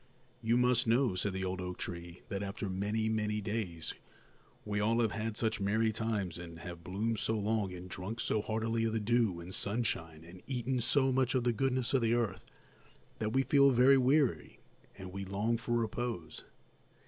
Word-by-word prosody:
"You 115 +1 +2
must 125 0 +3
know," 120 -1 +3
said 95 +2 0
the 95 0 -2
old 95 0 -3
oak 90 0 -5
tree, 85 0 -7
"that 100 - -2
after 100 +3 -4
many, 105 +4 -1
many 105 -1 0
days 100 -7 -3 0.7
we 105 -1 -1
all 115 +3 +2
have 115 -3 +2
had 110 0 -3
such 110 -2 0
merry 110 +3 +2
times 105 -6 -2
and 85 -1 -8
have 85 0 -8
bloomed 105 +5 -1
so 110 - 0
long 105 -2 0
and 90 0 -8
drunk 95 +5 -5
so 110 - +1
heartily 115 +1 -1
of 110 - 0
the 110 - +1
dew 110 -4 +2
and 85 +2 -8
sunshine 80 -8 -2
and 90 +2 -12
eaten 130 -1 -1
so 130 +3 +2
much 130 0 +2
of 125 - +2
the 120 -1 +2
goodness 130 +1 0
of 135 - +4
the 115 0 +3
earth 115 -6 -2 0.7
that 110 -1 -1
we 135 +3 +3
feel 140 0 +5
very 130 +2 +6
weary 125 - +2 0.4
and 95 -1 -8
we 100 +1 -5
long 100 +4 0
for 120 +1 -3
repose. 115 -7 -3
110 Hz, 190 wpm, -33 LUFS, 95-120 Hz, 0.7 s, very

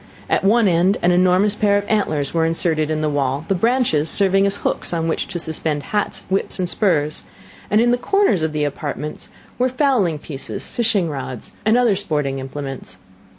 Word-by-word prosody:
At - - +2
one 220 +2 +4
end 180 +3 +3
an 175 - +4
enormous 185 +3 +3
pair 205 -1 +2
of 205 - -2
antlers 155 -10 0
were 165 -1 +2
inserted 160 -1 +1
in 155 0 -1
the 155 - 0
wall, 140 +1 -1
the - - +1
branches 195 - +1
serving 195 0 +3
as 200 - -1
hooks - - 0
on 165 -1 -1
which 160 - -1
to 180 - -5
suspend 160 -3 -2
hats, 210 -1 -1
whips, 190 +1 0
and 185 -2 -1
spurs; 155 -6 0 0.5
and 210 - +3
in 240 +1 +3
the 245 - +1
corners 395 - +2
of 160 0 0
the 150 -1 -1
apartment 150 +1 -4 0.3
were 255 +1 +2
fowling 250 - +1
pieces, 145 -2 -6
fishing 220 -7 +1
rods, 130 -5 -6 0.2
and 220 +2 +4
other 240 -5 +3
sporting 150 -8 -2
implements. 135 -6 -7
175 Hz, 190 wpm, -20 LUFS, 150-205 Hz, 0.5 s, one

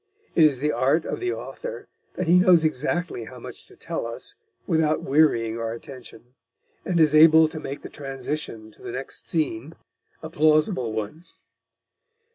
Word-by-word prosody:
It 160 - +6
is 140 -4 +2
the 150 +1 +1
art 145 +4 +1
of - - -4
the 370 0 -1
author - - -7 0.3
that 185 - -2
he 175 +2 +5
knows 180 -3 +5
exactly 155 -2 -2
how 125 +3 -11
much 120 - -10
to - - -18
tell - - -5
us 115 - -7 0.3
without 160 -2 +1
wearying 120 -7 +2
our 115 0 -3
attention, 120 0 -12 0.5
and 175 -2 0
is 155 -2 +4
able 160 +1 +7
to 155 - -7
make 140 -2 -6
the - - -6
transition 135 -5 -6
to - - -21
the - - -7
next 135 +2 -7
scene 155 -2 -2 0.5
a 160 - -6
plausible 155 - +2
one. 110 - -5
150 Hz, 165 wpm, -24 LUFS, 125-160 Hz, 0.5 s, able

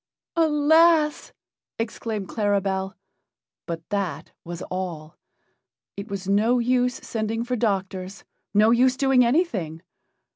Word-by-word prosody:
"Alas!" 315 0 +3 0.5
exclaimed 220 -2 -4
Claribel, 195 -2 -1 0.7
but 165 -2 -6
that 180 -6 -3
was 175 0 -7
all. 170 -4 -5 0.8
It 200 +2 -7
was 195 -1 -5
no 215 +5 +3
use 250 +1 +1
sending 225 0 -3
for 250 +1 -2
doctors 195 -4 -2 0.3
no 215 +2 +4
use 255 +2 +3
doing 265 -2 +4
anything. 220 - 0
215 Hz, 105 wpm, -24 LUFS, 190-250 Hz, 0.8 s, no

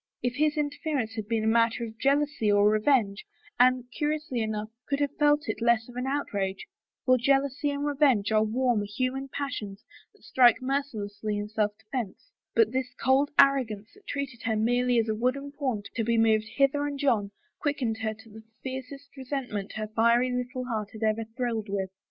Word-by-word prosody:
If 245 0 0
his 305 +1 +2
interference 290 -5 -2
had 215 -2 -5
been 225 -1 0
a - - 0
mat 230 0 +4
ter 235 - -4
of 225 0 -11
jealousy 280 -5 +2
or 205 0 +5
revenge, 215 -2 +2 0.4
Anne, 255 0 +5
curiously 300 -4 -1
enough, 215 -1 -3 0.2
could 280 0 0
have 285 -1 -1
felt 295 +1 +3
it - - -3
less 235 -1 +3
of 245 - -13
an 250 +1 -3
outrage, 200 -9 -2 0.4
for 255 -1 +4
jealousy 275 +3 +1
and 285 0 -2
revenge 270 -8 +2
are 215 0 +4
warm 240 0 +1
human 255 +6 -2
passions 250 -8 -5 0.3
that - - -25
strike 245 -3 +5
mercilessly 215 -6 -3
in 205 0 -4
self 210 -1 -1
defense, 220 - -6 0.2
but 450 - +4
this 255 -1 -3
cold 265 +3 +2
arrogance 245 -7 +3
that 410 0 -22
treated 275 -4 -4
her 225 -1 0
merely 245 +3 +2
as 225 -1 +2
a 220 - +1
wooden 255 +5 -1
pawn 260 -8 -2
to 230 - -1
be 230 +1 +1
moved 220 -1 +3
hither 285 +1 +2
and 285 -1 -5
yon 220 -7 +2 0.3
quickened 255 -7 -1
her 220 -1 -2
to 220 +1 -17
the 220 +1 -12 0.2
fiercest 265 +2 -7
resentment 255 -7 -4
her 215 0 -3
fiery 235 +3 +3
little 250 +1 -3
heart 215 -4 -3
had 220 0 -6
ever 220 +1 +1
thrilled 230 -4 -2
with. 195 -1 -2
245 Hz, 185 wpm, -27 LUFS, 220-275 Hz, 0.4 s, or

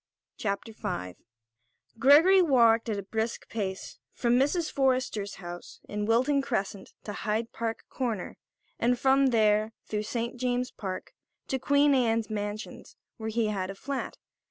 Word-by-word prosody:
CHAPTER 215 +2 -3
V 90 - -4 0.8
Gregory 325 +9 +7
walked 235 -8 +4
at 210 - -1
a 200 - -4
brisk 220 +3 -3
pace 190 -4 -4
from 235 -1 +1
Mrs. 290 +6 +2
Forrester's 255 -7 0
house 175 -1 -9
in 210 0 -3
Wilton 260 +5 +3
Crescent 195 -6 -3
to 210 - -5
Hyde 220 +2 -2
Park 225 -1 -4
Corner, 230 -8 -3 0.4
and 245 +1 +2
from 270 +2 +4
there, 215 -2 +3
through 210 -1 -2
St. 235 +3 -3
James's 250 0 -1
Park, 190 -3 -6 0.4
to 265 - 0
Queen 285 +2 +4
Anne's 230 -4 +1
Mansions 205 0 -5 0.2
where 220 -1 -4
he 220 -1 0
had 190 -3 -2
a 195 - -6
flat. 275 +7 -4
225 Hz, 145 wpm, -28 LUFS, 210-260 Hz, 0.8 s, Gregory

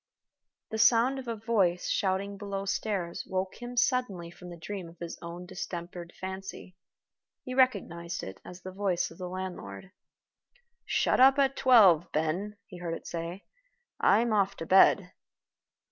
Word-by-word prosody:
The 220 - -3
sound 235 +5 +4
of 255 - -9
a 230 - -2
voice 205 -6 +1
shouting 195 +1 0
below 200 -1 -4
stairs 195 -3 -2
woke 190 +3 -3
him 245 0 -7
suddenly 210 -10 0
from 180 +1 -12
the 175 - -9
dream 180 +1 -6
of 170 - -17
his 170 0 -6
own 170 +1 -7
distempered 175 -1 -6
fancy. 190 -1 -7 0.7
He 255 - -6
recognized 195 -10 +1
it 95 - -8
as 180 +1 -11
the 185 - -7
voice 190 -3 -1
of 165 - -14
the 180 -1 -5
landlord. 185 - -7 1.0
"Shut - - +2
up 265 +2 +7
at 275 -1 +3
twelve, 190 - +6
Ben," 175 +7 -1
he 180 - -11
heard 170 -2 -3
it - - -10
say. 170 +3 -5 0.5
"I'm 230 0 +4
off 200 -1 +2
to 165 - -5
bed." 190 +1 +5
190 Hz, 155 wpm, -29 LUFS, 175-215 Hz, 1.0 s, up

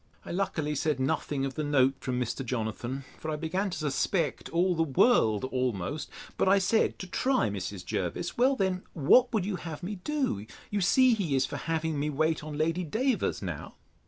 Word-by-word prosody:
I - - -6
luckily 165 -5 -1
said 150 -1 0
nothing 135 +1 0
of 135 - -3
the 155 - -3
note 135 -2 +3
from 125 -1 -2
Mr. 125 +2 -2
Jonathan; 120 +2 -3 0.2
for 160 - -5
I 155 - -1
began 165 +6 -1
to 185 - -4
suspect 155 +2 -1
all 180 +2 +2
the 165 - 0
world 135 - +3
almost: 130 - -2 0.3
but - - +3
I 200 - +6
said, 200 +3 +2
to - - -6
try 255 +9 +1
Mrs. - - -5
Jervis, - - -3
Well 260 +3 +4
then, 190 -4 0
what 240 - +5
would 210 -5 0
you 195 -2 -2
have 165 -1 -7
me 200 +3 -4
do? 220 - -2 0.2
You 205 -1 0
see 250 +7 +5
he 180 -10 0
is 135 - +3
for - - -5
having 160 -2 -1
me 150 +1 0
wait 155 +2 0
on 150 -1 -6
Lady 165 +3 0
Davers 230 - 0
now. - - -6
160 Hz, 195 wpm, -29 LUFS, 135-195 Hz, 0.3 s, I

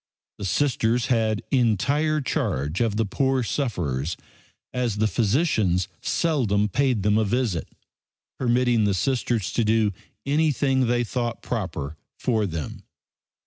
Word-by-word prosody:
The 100 - -4
Sisters 120 +2 +1
had 110 -2 0
entire 140 +6 +2
charge 75 - -1
of 115 -3 +1
the 110 +1 +1
poor 130 +5 +1
sufferers, 85 - -2 0.6
as 125 -4 0
the 110 - +2
physicians 105 - +1
seldom 110 -11 +1
paid 125 -1 +1
them 105 +1 +3
a - - +3
visit, 110 -5 -1 0.7
permitting 120 -3 +2
the 100 -2 +2
Sisters 120 -2 0
to 120 - +1
do 110 -1 +2 0.3
anything 140 -3 +2
they 120 0 +2
thought 120 0 -3
proper 80 - -4 0.2
for 110 -4 0
them. 80 -4 -5
115 Hz, 125 wpm, -24 LUFS, 100-130 Hz, 0.7 s, them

